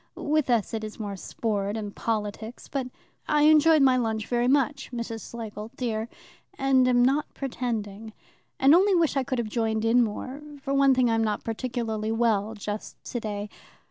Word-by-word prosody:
With 300 -2 0
us 230 -3 +1
it 220 -1 -3
is 215 +1 -7
more 205 -2 -4
sport 205 +1 -2
and 205 -2 -6
politics, 220 +1 -4
but 270 -3 -3 0.4
I 300 -1 +3
enjoyed 310 0 +6
my 260 -1 +5
lunch 220 -3 -1
very 240 0 0
much, 275 +1 +1
Miss 235 -2 -4 0.2
Schlegel, 220 -2 -7
dear, 225 -2 -2 0.5
and 265 -1 +3
am 245 -1 +4
not 280 +3 +1
pretending, 225 -5 -4 0.5
and 270 +2 +6
only 385 +3 +5
wish 330 -4 +2
I 270 - +2
could 260 0 -3
have 235 -2 -1
joined 220 0 -1
in 240 +2 +5
more. 255 +6 -5 0.2
For 275 - -2
one 275 -1 +5
thing, 255 -1 +3
I'm 225 0 +2
not 210 -1 -1
particularly 225 -2 -3
well 225 -2 +1
just 210 0 -6
today. 210 -3 -4
235 Hz, 175 wpm, -26 LUFS, 215-265 Hz, 0.5 s, enjoyed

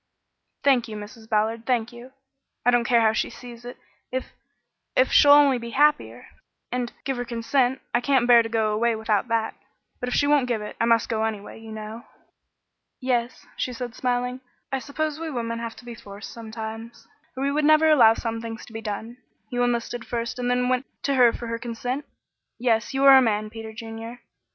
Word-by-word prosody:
"Thank 260 -4 +3
you, 215 - -7
Mrs. 220 +2 -11
Ballard, 225 +1 0
thank 240 -2 0
you. 240 +2 -12 0.5
I 245 - +6
don't 240 -1 +2
care 235 -1 +4
how 220 -1 +4
she - - -1
sees 240 -1 -11
it, 245 - -8 0.3
if 260 0 -4 0.6
if - - +3
she'll 290 - +6
only 285 -3 +6
be 235 0 -7
happier 295 +1 +2 0.5
and 245 -1 -2
give 270 -2 -2
her 245 - -2
consent. 245 +2 0
I 240 - +2
can't 265 -2 +2
bear 240 -1 +7
to 225 - -4
go 220 -2 +1
away 230 +2 +1
without 220 +1 0
that; 230 -1 0 0.5
but 250 - -3
if - - -1
she 285 - +3
won't 285 -3 +3
give 235 -3 0
it, 210 0 -7
I - - +4
must 230 -1 +3
go 220 -2 -1
anyway, 215 -1 -4
you 225 0 -11
know." 215 +2 -8 0.9
"Yes," 250 -1 -1
she 250 - -3
said, 245 -1 -6
smiling, 250 0 -1 0.3
"I 270 - 0
suppose 305 +2 -3
we 325 0 -4
women 230 -4 -3
have 230 -1 -5
to 245 - -14
be 240 - -7
forced 205 -2 -10
sometimes, 225 +1 -8 0.3
or 275 +1 0
we 300 - +1
never 310 +1 +5
would 315 - +6
allow 225 -6 +6
some 230 -1 -4
things 230 0 -7
to 230 - -15
be 225 - -5
done. 220 +3 -5 0.3
You 245 0 -1
enlisted 240 0 -1
first 235 +1 -3
and 245 0 -1
then 250 0 +1
went 255 +1 0 0.2
to 280 - +1
her 250 -3 +6
for 235 - -7
her 230 0 -3
consent? 245 +4 -4 0.5
Yes, 230 -1 +1
you 270 0 0
are 270 -1 +10
a - - +4
man, 215 -3 0
Peter 225 0 -8
Junior. 225 +1 -8
235 Hz, 205 wpm, -24 LUFS, 225-255 Hz, 0.9 s, are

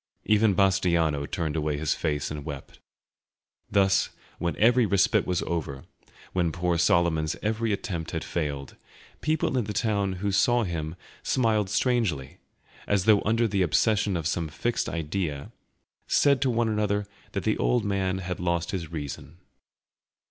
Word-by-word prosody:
Even 105 -1 +3
Bastiano 85 -7 +2
turned 80 -3 -2
away 75 -2 -1
his 75 0 0
face 75 -3 -2
and 75 -1 -5
wept. 70 -2 -8 0.9
Thus, 95 -1 +3 0.3
when 85 0 -1
every 120 +3 +5
respite 100 -1 +2
was 90 -2 0
over, 70 -5 -3 0.5
when 85 -3 +1
poor 85 +1 0
Solomon's 85 -2 +2
every 110 +1 0
attempt 85 -5 -3
had 80 -4 -3
failed, 70 -4 -4 0.5
people 155 -4 +1
in 115 - -1
the 105 - -4
town 100 -2 0
who 100 +2 -2
saw 120 +5 +3
him 80 -4 -4 0.3
smile 110 -5 +1
strangely, 100 - 0 0.5
as 100 -2 +1
though 110 -2 +5
under 115 +2 +2
the 100 -2 0
obsession 100 +2 +2
of 80 - -4
some 85 0 -1
fixed 95 +11 -2
idea, 80 -3 -3 0.6
said 140 -2 +3
to 135 - +2
one 120 -1 +1
another 105 -1 0 0.3
that - - -2
the - - 0
old 120 -3 +2
man 95 -2 0
had 90 -1 -4
lost 85 -1 -1
his 85 -5 -4
reason. 75 0 -6
95 Hz, 150 wpm, -26 LUFS, 80-105 Hz, 0.9 s, every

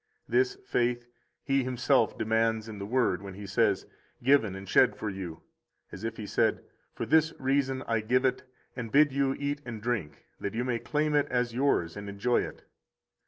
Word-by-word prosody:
This 390 0 +2
faith 120 - 0 0.4
He 135 -1 +1
Himself 125 -1 +2
demands 110 0 +1
in 105 -2 -8
the 100 - -5
Word 120 -6 +1
when 100 -2 -8
He 100 +1 -8
says: 100 +1 +1 0.4
Given 120 -7 +4
and 95 0 -8
shed - - +4
for 105 - -4
you. 90 -4 -7 0.5
As 95 - -9
if 115 0 -3
He 105 - -5
said: - - +1 0.3
For - - -3
this 160 0 +3
reason 135 0 0
I 115 -1 +1
give 125 +5 +1
it, 130 - +1 0.3
and 115 -3 -5
bid 145 0 +5
you 135 -1 +1
eat 145 0 -2
and 120 -4 -6
drink, 105 -10 -3
that 100 - -4
you 120 - 0
may 125 -2 -1
claim 150 +3 0
it 145 -1 +3
as 125 -2 0
yours 120 -10 +1
and 100 0 -6
enjoy 105 +5 +1
it. - - -7
120 Hz, 190 wpm, -29 LUFS, 105-135 Hz, 0.5 s, bid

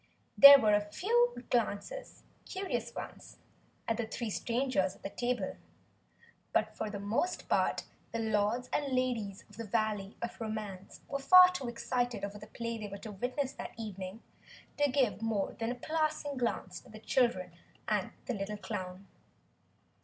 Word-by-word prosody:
There 280 0 +12
were 215 -5 +3
a 205 - +4
few 470 - +1 1.0
curious 380 0 -3
glances - - -8 0.5
at 225 - +1
the 235 -2 -2
three 230 0 -4
strangers 235 -5 0
at - - -22
the 195 - -4
table, 240 -5 -2 1.0
but - - +1
for 220 - -3
the 205 - -5
most 220 - -1
part - - +1 0.3
the 230 - -2
Lords 220 +2 +1
and 280 -3 0
Ladies 230 -6 -1
of - - -17
the 230 - -4
Valley 215 -2 -1
of 235 0 -5
Romance 210 -4 -5
were 280 - -3
far 365 +6 +9
too 320 -9 -4
excited 240 -2 -2
over 205 +1 -8
the 210 - -10
play 230 +1 -4
they 210 - -5
were 200 0 -7
to 215 +2 -8
witness 255 +6 -2
that - - -8
evening 200 -1 -6 0.5
to 290 0 +3
give 250 -7 +1
more 220 -3 -1
than 225 +1 -1
a - - -3
passing 310 +1 -1
glance 230 -7 -2
to - - -18
the 215 - -10
children 215 -6 +1 0.4
and - - 0 0.2
the 250 - -2
little 205 0 -4
clown. 190 -2 -6
225 Hz, 160 wpm, -32 LUFS, 205-255 Hz, 1.0 s, There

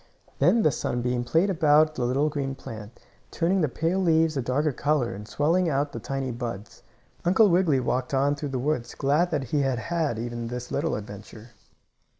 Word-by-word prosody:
Then 230 -1 +4
the 155 - +4
sunbeam 120 -1 -2
played 165 +10 +2
about 155 -2 +4
the 125 -5 -2
little 135 +5 +1
green 140 -3 -3
plant, 110 -2 -10 0.3
turning 180 +3 +1
the 150 - +1
pale 165 +8 -1
leaves 165 -3 +2
a 135 - 0
darker 140 +5 0
color 140 -3 0
and 105 +2 -9
swelling 165 +7 +1
out 140 0 0
the 115 - -6
tiny 135 +2 -3
buds. 115 -4 -6 0.4
Uncle 190 +5 +4
Wiggily 170 -6 +3
walked 125 +1 -1
on 140 +1 +2
through 145 0 -5
the 135 - -3
woods, 125 -2 -2
glad 150 +6 +1
that 150 -5 -1
he 150 - +2
had 135 -2 0
had 160 -3 -2
even 120 0 -4
this 125 +1 -6
little 155 +3 -1
adventure. 105 +2 -10
140 Hz, 185 wpm, -26 LUFS, 120-160 Hz, 0.4 s, Then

